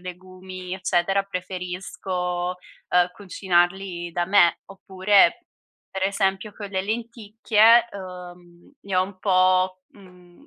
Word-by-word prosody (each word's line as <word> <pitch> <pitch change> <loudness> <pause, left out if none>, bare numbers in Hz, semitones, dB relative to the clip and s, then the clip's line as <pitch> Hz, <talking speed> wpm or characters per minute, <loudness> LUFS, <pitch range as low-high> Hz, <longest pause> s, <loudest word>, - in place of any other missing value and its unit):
legumi, 185 0 -9
eccetera, 190 +1 0
preferisco, 180 -1 -4 0.3
ehm, 180 0 +3
cucinarli 180 -2 -1
da 175 0 -1
me. 175 -3 +4
Oppure, 195 - +2 0.5
per 190 0 -3
esempio 195 +1 -1
con 205 -2 -8
le 190 - -1
lenticchie, 225 +1 +2
uhm, 180 0 -11
ne 195 -2 -3
ho 185 - +4
un 185 0 -8
po', 185 -1 +2
uhm, 180 - -19
185 Hz, 110 wpm, -23 LUFS, 180-200 Hz, 0.5 s, me